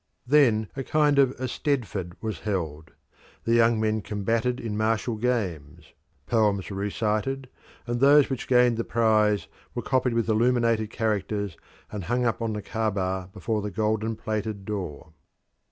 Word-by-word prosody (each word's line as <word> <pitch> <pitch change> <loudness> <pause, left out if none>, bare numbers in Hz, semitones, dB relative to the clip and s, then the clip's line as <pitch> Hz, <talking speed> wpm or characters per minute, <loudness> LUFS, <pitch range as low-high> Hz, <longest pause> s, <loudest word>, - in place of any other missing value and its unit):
Then 120 -6 +4
a 135 - -3
kind 150 0 +3
of 135 -1 +4
Eisteddfod 125 - -2
was 110 -6 -4
held. 80 -7 -3 0.5
The 115 - +1
young 115 -1 +4
men 110 0 0
combated 115 +5 -1
in 110 -3 -4
martial 110 +2 0
games; 100 - -3 0.3
poems 105 -4 +1
were 95 - -5
recited, 110 +6 -1 0.4
and 120 -1 -2
those 140 +2 +6
which 135 - -4
gained 125 -2 +4
the 115 - 0
prize 110 -3 +2 0.3
were - - -3
copied 125 -2 +1
with 115 -1 +1
illuminated 115 -1 +2
characters 105 -3 -2 0.4
and 100 -4 -5
hung 120 +6 0
up 115 0 0
on 115 -1 -1
the 105 -1 -5
Caaba 95 -4 -2
before 105 +2 -2
the 105 - -3
golden 110 +2 -1
plated 110 -2 -4
door. 90 -7 -5
110 Hz, 150 wpm, -26 LUFS, 105-120 Hz, 0.5 s, those